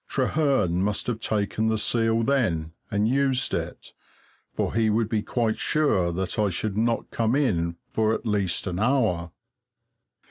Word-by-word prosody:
Trehearn 130 - +1
must 105 +1 0
have 120 -3 -2
taken 110 0 -1
the 110 0 +1
seal 115 +1 +1
then, 100 - 0 0.2
and 105 +1 +1
used 135 0 +1
it, - - -5 0.6
for - - -1
he 110 -1 +2
would 110 +1 +1
be 110 -1 0
quite 115 0 -1
sure 100 - +1
that 95 +4 -3
I 105 -1 +2
should 95 +3 -2
not 115 +2 0
come 115 +2 +1
in 85 - +1 0.2
for 110 0 +2
at - - -7
least 100 -5 0
an 90 -1 -3
hour. 110 -8 +1
110 Hz, 155 wpm, -25 LUFS, 95-120 Hz, 0.6 s, he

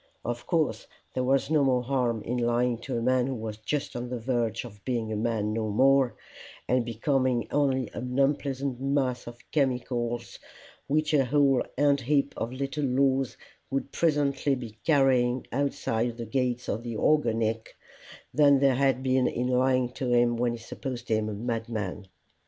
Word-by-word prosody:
Of 120 0 -4
course 160 -5 0 0.3
there 130 - -1
was 135 +3 +1
no 150 -2 +4
more 130 -2 +2
harm 120 -4 0
in 125 +2 -2
lying 120 0 +1
to 125 0 -4
a 115 - -2
man 130 0 +2
who 135 - -2
was 110 -2 -5
just 135 +6 -3
on 120 0 -4
the 125 - -3
verge 115 -1 -1
of 105 -4 -12
being 115 -4 -2
a - - -2
man 110 -1 -1
no 110 -1 -1
more, 135 +3 +3 0.5
and 125 -1 +2
becoming 125 +1 0
only 135 -4 +1
an 125 +1 -4
unpleasant 135 -2 0
mass 135 -3 0
of 120 0 -8
chemicals, 120 -4 -1 0.5
which 155 +1 +1
a 140 -3 +4
whole 135 -1 +3 0.2
ant 140 0 +3
heap 140 +2 +1
of 115 - -3
little 135 +3 -3
laws 135 -1 +1 0.3
would 135 0 -2
presently 145 -3 +1
be 115 -4 -9
carrying 130 -4 +3
outside 120 -3 -1
the 120 - -5
gates 125 +1 -1
of 110 - -2
the 115 -2 -5
organic, 115 -6 +1 0.6
than 140 0 +5
there 135 0 +4
had 130 0 +1
been 130 -1 +2
in 125 - -1
lying 130 0 +2
to 125 -1 -3
him 120 0 +3
when 120 0 0
he - - -5
supposed 120 +1 -7
him 110 -1 +1
a - - -4
madman. 110 -3 -4
125 Hz, 170 wpm, -27 LUFS, 115-135 Hz, 0.6 s, than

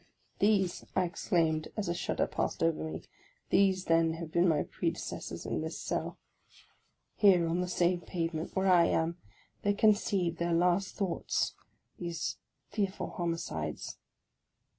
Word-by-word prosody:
" - - -39
These," 200 -4 +2
I 185 - +3
exclaimed, 165 -3 0
as 210 - -1
a 170 - +1
shudder 175 - 0
passed - - -2
over 165 -1 +1
me, 160 - -5 0.2
" - - -37
these, 190 -1 +3
then, 165 -1 +3
have 165 -1 -6
been 175 +2 +3
my 155 -3 +3
predecessors 170 -1 -4
in - - -1
this - - -4
cell. - - -3 1.0
Here, 185 -5 +5
on 170 +2 0
the 180 - -1
same 175 0 +1
pavement 165 -2 -3
where 190 0 +1
I 180 -3 +6
am, 165 +1 +1 0.4
they 205 0 +1
conceived 200 -5 +2
their 170 0 +1
last 180 +3 +2
thoughts, 190 -4 -1 0.2
— - - -38
these 170 -2 -3 0.3
fearful 200 -2 -2
homicides 165 - -3
175 Hz, 150 wpm, -31 LUFS, 165-190 Hz, 1.0 s, I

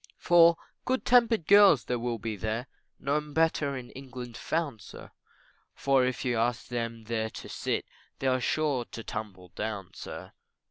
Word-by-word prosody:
For 170 -1 +6 0.3
good 260 +1 -1
tempered 235 -7 +4
girls 200 +1 +7
there 125 -1 -1
will 120 0 -2
be 110 0 -4
there, 110 +4 -3 0.3
No 145 +2 0
better 150 -2 0
in 125 -1 -9
England 125 -3 -8
found, 150 -9 -2
sir, - - -11 0.6
For 135 -2 +3
if 130 0 -3
you 120 -2 +1
ask 115 0 -1
them 115 -2 -3
there 110 0 -2
to - - -9
sit, - - -2 0.3
They're 130 -1 +1
sure 140 -2 0
to 115 - -8
tumble 100 -5 -7
down, 100 +1 -5
sir. - - -8
125 Hz, 155 wpm, -29 LUFS, 115-150 Hz, 0.6 s, girls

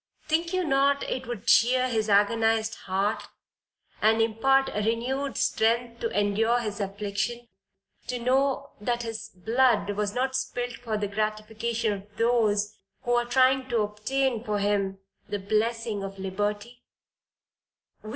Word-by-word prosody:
Think 335 +2 +1
you 370 -1 0
not 280 -2 +2
it 255 - -4
would 235 -3 -6
cheer 255 +2 +4
his 220 -3 -1
agonized 225 +2 +3
heart, 195 +2 -2 0.7
and 220 +1 +4
impart 270 +5 +2
renewed 240 +6 -1
strength 235 +1 +1
to 230 -3 -1
endure 220 +4 +2
his 215 -3 -4
affliction, 205 +4 -3 0.6
to 250 - -2
know 270 +3 +1
that 240 +2 -1
his 225 -1 -5
blood 225 +3 +2
was 205 +1 -2
not 260 +1 0
spilt 245 -2 -2
for 225 -3 -3
the 205 -1 -1
gratification 215 +2 -2
of 205 +1 -10
those 215 -3 +2 0.3
who 245 - -2
are 240 0 +2
trying 260 +1 +3
to 235 -2 +2
obtain 225 +4 -1
for 210 -3 -1
him 200 -1 0 0.3
the 205 - -1
blessing 215 +2 -1
of 195 0 -6
liberty. 205 +5 -3
225 Hz, 135 wpm, -27 LUFS, 210-245 Hz, 0.7 s, cheer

